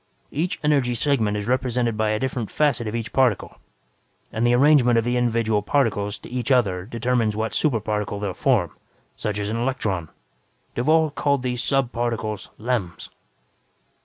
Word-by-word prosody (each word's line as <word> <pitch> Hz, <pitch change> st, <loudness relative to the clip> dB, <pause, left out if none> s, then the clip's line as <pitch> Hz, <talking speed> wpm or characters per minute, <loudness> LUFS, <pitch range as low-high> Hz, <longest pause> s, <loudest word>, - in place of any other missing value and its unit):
Each 165 Hz, +5 st, -2 dB
energy 140 Hz, -5 st, +2 dB
segment 115 Hz, -6 st, +1 dB
is 105 Hz, -, -4 dB
represented 125 Hz, -2 st, 0 dB
by 110 Hz, 0 st, 0 dB
a 110 Hz, -, +1 dB
different 125 Hz, -2 st, -3 dB
facet 140 Hz, -7 st, +1 dB
of 105 Hz, -, -3 dB
each 115 Hz, -2 st, -4 dB
particle, 130 Hz, -6 st, +1 dB, 0.8 s
and 115 Hz, +2 st, +1 dB
the 120 Hz, -, +4 dB
arrangement 130 Hz, -3 st, +5 dB
of 115 Hz, -, +2 dB
the 120 Hz, 0 st, 0 dB
individual 115 Hz, -3 st, +1 dB
particles 105 Hz, -4 st, 0 dB
to -, -, -12 dB
each 125 Hz, +1 st, -3 dB
other 95 Hz, -8 st, +2 dB
determines 115 Hz, -1 st, 0 dB
what 110 Hz, +1 st, -2 dB
super 140 Hz, -8 st, +1 dB
particle 105 Hz, -1 st, -2 dB
they 100 Hz, -, -4 dB
will 95 Hz, -, -2 dB
form, 110 Hz, -, +1 dB, 0.4 s
such 105 Hz, -1 st, -3 dB
as 105 Hz, 0 st, -2 dB
an 115 Hz, -, -2 dB
electron. 110 Hz, -9 st, -2 dB, 0.6 s
Duvall 155 Hz, +5 st, +2 dB
called 140 Hz, -2 st, 0 dB
these 125 Hz, -1 st, -1 dB
sub 135 Hz, -3 st, +1 dB
particles 115 Hz, -4 st, -3 dB
'lems'. 110 Hz, -6 st, -3 dB
120 Hz, 165 wpm, -23 LUFS, 105-130 Hz, 0.8 s, arrangement